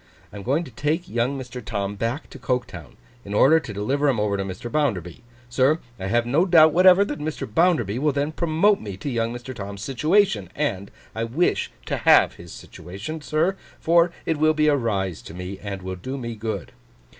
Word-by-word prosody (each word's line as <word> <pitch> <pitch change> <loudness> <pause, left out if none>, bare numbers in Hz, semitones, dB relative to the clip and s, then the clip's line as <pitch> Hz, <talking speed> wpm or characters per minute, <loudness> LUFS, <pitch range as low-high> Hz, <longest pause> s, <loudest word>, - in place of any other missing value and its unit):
I - - -8
am - - -7
going 140 - 0
to 140 - -11
take 155 +9 -2
young 125 +1 -1
Mr. 125 -1 -7
Tom 100 -3 -3
back 115 +8 -3
to - - -10
Coketown, 120 - -4 0.3
in 100 +1 -5
order 155 +9 +6
to 135 - -8
deliver 135 +8 0
him 125 -5 +1
over 105 -1 0
to 100 - -2
Mr. 95 +5 -7
Bounderby. 100 - -1 0.3
Sir, 130 +5 +2 0.2
I 95 - -4
have 120 +3 +1
no 140 +8 +2
doubt 160 -3 +6
whatever 185 +3 +6
that 145 -5 -5
Mr. 150 +1 -4
Bounderby 120 - +1
will 150 +2 +2
then 145 +2 -1
promote 170 +6 +2
me 100 -3 -7
to 135 +8 -4
young 115 -1 -1
Mr. 120 +2 -7
Tom's 100 -2 -7
situation. 135 - +1
And 100 -10 -2 0.2
I 115 +1 -2
wish 145 +10 0
to - - -2
have - - +5
his 85 -1 -12
situation, 100 - -8
sir, 160 +6 0 0.2
for 170 +1 +3
it 160 - 0
will 155 +1 +3
be 155 0 +2
a 145 - +4
rise 100 - -2
to 80 - -11
me, 90 +2 -6
and 100 -2 -6
will 95 0 -4
do 130 +9 -5
me 120 -3 -5
good. 110 -3 -5
125 Hz, 205 wpm, -23 LUFS, 100-155 Hz, 0.3 s, order